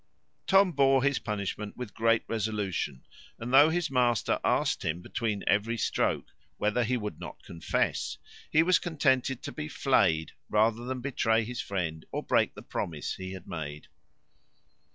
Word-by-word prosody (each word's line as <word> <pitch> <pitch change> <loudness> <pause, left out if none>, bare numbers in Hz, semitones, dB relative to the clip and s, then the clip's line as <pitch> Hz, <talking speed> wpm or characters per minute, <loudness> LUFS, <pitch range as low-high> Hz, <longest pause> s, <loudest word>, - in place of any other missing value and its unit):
Tom 195 -1 +5
bore 135 -3 +4
his 140 0 +2
punishment 105 -1 -4
with 125 -5 -6
great 115 0 +2
resolution; 105 - -2 0.3
and 120 +3 -5
though 145 +4 +8
his 165 -2 -1
master 120 -4 +2
asked - - +1
him, 80 +2 -1
between 105 +2 -3
every 110 +3 +1
stroke, 100 - 0 0.3
whether 105 +3 +1
he 125 +2 0
would 105 -8 -5
not - - -9
confess, 85 - -1 0.3
he 160 - +4
was 180 0 +4
contented 135 -6 +1
to - - -5
be 75 - -5
flead 80 0 +2 0.2
rather 110 +2 +2
than 130 0 -3
betray 115 -4 +1
his 120 +2 -4
friend, 85 -5 -3
or - - -3
break - - +2
the - - -10
promise 75 -3 -3
he 95 0 -6
had 95 -2 -10
made. 75 -3 -6
115 Hz, 155 wpm, -29 LUFS, 95-130 Hz, 0.3 s, though